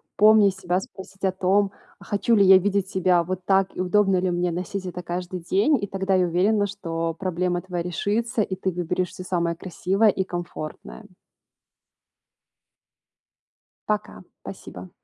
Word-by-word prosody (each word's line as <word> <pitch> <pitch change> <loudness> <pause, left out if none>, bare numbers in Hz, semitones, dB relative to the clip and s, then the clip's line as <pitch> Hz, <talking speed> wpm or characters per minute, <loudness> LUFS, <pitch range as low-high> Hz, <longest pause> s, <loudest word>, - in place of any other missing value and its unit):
Помни 215 -1 +6
себя, 185 -1 -1
спросить 195 0 -12
о 190 - +2
том: 190 +2 +1 0.3
"А - - -14
хочу 210 +4 +1
ли 200 - +5
я 190 0 +9
видеть 195 0 0
себя 180 -2 +2
вот 185 +1 -4
так 195 -1 +2
и - - -2
удобно 195 +1 +3
ли 180 0 0
мне 175 0 0
носить 185 +3 -4
это 180 0 -6
каждый 180 +1 -5
день?" 200 - +2
И 200 - -3
тогда 195 0 -1
я 185 -1 +3
уверена, 200 +5 +2
что 165 -4 -3
проблема 180 -1 -1
твоя 180 -2 -4
решится, 210 - -1
и 195 -2 -2
ты 190 0 -2
выберешь 180 +1 -2
всё 185 - -9
самое 170 -2 -1
красивое 190 +4 +1
и 190 -1 0
комфортное. 175 +3 -7 2.8
Пока, 210 -1 -2 0.2
спасибо. - - -9
185 Hz, 155 wpm, -24 LUFS, 180-200 Hz, 2.8 s, я